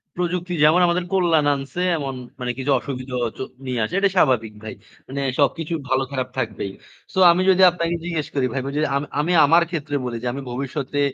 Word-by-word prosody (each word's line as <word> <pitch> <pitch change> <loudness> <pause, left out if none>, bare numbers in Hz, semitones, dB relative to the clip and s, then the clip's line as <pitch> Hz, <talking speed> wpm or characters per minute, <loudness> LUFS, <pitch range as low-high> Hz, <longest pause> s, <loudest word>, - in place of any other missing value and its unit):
প্রযুক্তি 180 0 -2
যেমন 165 +4 +5
আমাদের 175 +1 +1
কল্যাণ 165 -5 +3
আনসে, 140 +6 -5 0.2
এমন 135 -3 -4 0.2
মানে 125 -1 -2
কিছু 135 +2 0
অসুবিধাও 125 0 -5
হয়তো 115 +3 -5 0.2
নিয়ে 125 -2 -2
আসে। 135 - -4
এটাই 200 -1 +2
স্বাভাবিক 115 -9 +2
ভাই। 110 - -6 0.3
মানে 140 +1 -4 0.2
সবকিছুর 160 +3 0
ভালো 130 +1 +2
খারাপ 130 -2 -2
থাকবেই। 105 -5 -3 0.4
সো 190 - 0
আমি 175 +2 +1
যদি 190 0 +4
আপনাকে 170 -1 -2
জিজ্ঞেস 165 -3 -3
করি, 135 - +2
ভাই 135 - -1
বুঝে 140 +2 -2
আম 140 - 0 0.2
আমি 160 +4 0
আমার 165 +4 +5
ক্ষেত্রে 155 -4 -3
বলি 120 -1 -3
যে 125 - -2
আমি 140 - -5
ভবিষ্যতে, 135 +2 -3
145 Hz, 195 wpm, -22 LUFS, 130-170 Hz, 0.4 s, যেমন